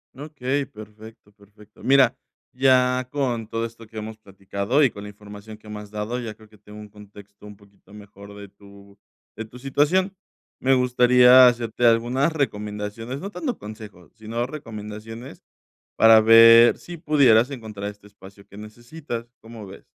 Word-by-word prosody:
Okey, 140 -1 -4
perfecto, 110 -1 -15
perfecto. 105 +1 -21
Mira, 135 -2 +3 0.4
ya 125 -1 +2
con 125 -6 -3
todo 115 +1 -3
esto 115 0 -11
que 110 - -13
hemos 110 0 -7
platicado 100 +6 -2
y 135 - +4
con 100 -2 -11
la 105 - -9
información 105 +1 -13
que 110 0 -17
me 105 0 -7
has 105 -1 -13
dado, 105 +3 -4
ya 115 -3 -7
creo 110 0 -20
que 105 - -21
tengo 105 +1 -14
un 105 0 -12
contexto 105 0 -16
un 105 0 -12
poquito 100 0 -23
mejor 100 -1 -14
de 100 0 -11
tu 100 0 -19 0.4
de 110 - -7
tu 120 +3 -15
situación. 155 +9 0 0.4
Me 135 - +2
gustaría 125 0 +5
hacerte 120 0 -1
algunas 120 +6 +1
recomendaciones 105 -2 -5
no 195 - -7
tanto 250 +2 -5
consejos, 105 -4 -12
sino 115 +2 -5
recomendaciones, 115 -3 -10 0.5
para 110 0 +6
ver 115 +1 +7
si 175 - -10
pudieras 135 -6 +3
encontrar 110 -6 -7
este 105 0 -18
espacio 100 -1 -17
que 100 - -17
necesitas, 120 +3 -9
¿cómo 115 -2 -12
ves? 95 +1 -13
110 Hz, 160 wpm, -22 LUFS, 105-125 Hz, 0.5 s, ver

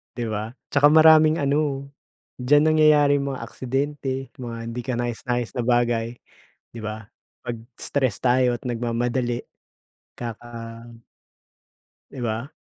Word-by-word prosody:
'Di 120 - -3
ba? 110 +3 -4 0.2
Saka 145 0 +6
maraming 155 0 +7
ano, 140 -1 0 0.5
diyan 145 +4 +4
nangyayari 150 -2 +5
yung 140 -1 -2
mga - - -7
aksidente, 135 0 -3
mga 120 -2 -5 0.2
hindi 125 - -5
kanais-nais 120 -1 -2
na 125 - -6
bagay, 120 -1 +1 0.6
'di - - -6
ba? 110 -1 -6 0.3
Pag 120 -1 -5 0.2
stress 130 -6 -1
tayo 125 -1 +2
at - - -21
nagmamadali, 120 +1 -1 0.8
kaka 120 0 -7 1.6
'Di 130 - -8
ba? 115 +3 -3
125 Hz, 120 wpm, -23 LUFS, 120-140 Hz, 1.6 s, maraming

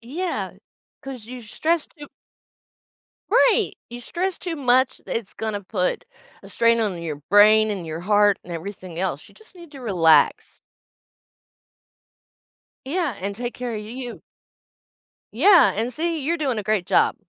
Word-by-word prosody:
yeah. 320 +10 -4 0.5
'Cause 265 -5 -8
you 250 +1 -8
stress 315 +8 -1
too 295 -2 -13 1.3
right! - - +4 0.2
You 240 0 -7
stress 360 +7 -3
too 345 -2 -4
much, 260 -2 +2
it's 230 -4 -5
gonna 215 -2 -3
put 185 - -2 0.4
a - - -13
strain 230 0 +3
on 200 -6 -1
your 155 -3 -4
brain, 215 +2 +6
and 190 -5 -4
your 160 +1 -5
heart, 205 +1 +3
and 175 - -11
everything 180 0 -7
else, 180 -6 -3
you - - -21
just 440 -2 -21
need 340 -4 -13
to 275 - -10
relax. 175 -9 +2 2.2
Yeah, 315 -2 -1
and 200 +1 -3
take 240 +1 -5
care 245 -1 -5
of 210 - -4
you. 240 +3 -8 1.1
Yeah, 350 - +6
and 230 +4 -2
see, 325 +1 -2
you're 335 +5 0
doing 270 -7 -1
a 210 - -3
great 205 -3 0
job, - - +3
230 Hz, 150 wpm, -23 LUFS, 200-290 Hz, 2.2 s, brain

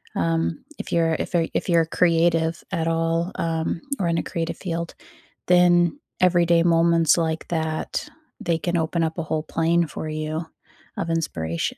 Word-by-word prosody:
Um, 85 0 -1
if - - -6
you're 165 -1 +2
if - - -4
you're 165 -1 +2
if - - -2
you're 165 -1 +4
creative 165 -1 +2
at 165 -3 -1
all, 165 +2 0
um, 165 0 -2 0.2
or 175 - 0
in 165 0 +1
a - - 0
creative 165 0 -3
field, 170 -2 -4 0.5
then 175 +6 +4 0.2
everyday 175 -2 +4
moments 165 -1 +4
like 160 -1 -1
that, 160 -2 -2 0.3
they 170 -1 0
can 175 +1 -2
open 165 +1 0
up 160 +1 -2
a 165 - -1
whole 155 -1 -2
plane 165 0 +1
for 155 +1 -6
you 155 +1 -3 0.5
of 165 - -2
inspiration. 85 - -2
165 Hz, 165 wpm, -23 LUFS, 160-170 Hz, 0.5 s, you're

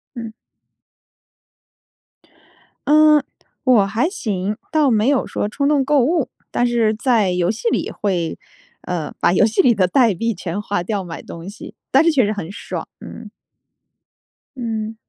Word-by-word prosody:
嗯。 230 -2 -6 2.6
嗯， 300 -1 +5 0.4
我 240 -7 +4
还 225 +10 0
行。 210 - -3
倒 305 -3 +3
没 215 0 +2
有 280 -2 +2
说 205 - -2
冲 280 +6 -1
动 290 -2 +3
购 290 +1 +2
物， 315 0 +1 0.2
但 245 - +1
是 230 -2 +2
在 220 -4 +1
游 180 -1 0
戏 225 - -4
里 - - -1
会， 180 -5 -2 0.4
呃， 165 -4 -4
把 170 - +3
游 195 - +4
戏 220 0 +2
里 245 - +4
的 185 -2 +2
代 235 +2 +3
币 230 +6 -1
全 180 +1 -4
花 205 -3 -2
掉 200 +1 -2
买 165 -2 -8
东 170 +3 -9
西， 210 +5 -10 0.2
但 270 +3 +5
是 335 - +4
确 265 -7 +3
实 205 - -1
很 200 -4 -5
爽， 220 - -6
嗯。 - - -10 1.3
嗯。 225 -3 -4
220 Hz, 165 characters per minute, -19 LUFS, 195-265 Hz, 2.6 s, 嗯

